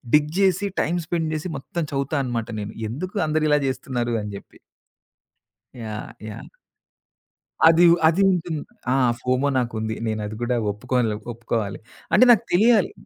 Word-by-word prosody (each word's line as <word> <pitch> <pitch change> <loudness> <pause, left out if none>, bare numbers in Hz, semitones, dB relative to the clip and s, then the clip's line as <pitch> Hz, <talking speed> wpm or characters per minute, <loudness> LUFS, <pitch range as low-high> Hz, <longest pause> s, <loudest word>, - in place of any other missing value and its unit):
డిగ్ 150 0 +2
జేసి 195 +1 +2
time 175 +1 0
spend 165 -1 -1
జేసి 155 +3 -3
మొత్తం 170 +5 -4
చదువుతా 140 +2 -2
అనమాట 120 -3 -3
నేను. 105 - -5 0.2
ఎందుకు 180 - -6
అందరు 155 0 +1
ఇలా 150 - +4
చేస్తున్నారు 125 -2 -2
అని 105 0 -6
జెప్పి. - - -16 1.2
యాహ్! 110 -1 -6 0.2
యాహ్! 105 - -9 1.2
అది 165 +1 +6
ఉ - - +5
అది 165 +4 +2
ఉంటుంది. 165 -4 -2 0.3
ఆ - - +3 0.3
ఫోమో 130 +3 +1
నాకుంది. 110 -3 -2
నేనది 110 -1 -3
కూడా 120 +1 0 0.2
ఒప్పుకోలే 115 +1 -1 0.2
ఒప్పుకోవాలి. 115 -3 -3 0.3
అంటే 255 - +7
నాకు 225 - +5
తెలియాలి 215 +1 +4
130 Hz, 140 wpm, -23 LUFS, 115-165 Hz, 1.2 s, అంటే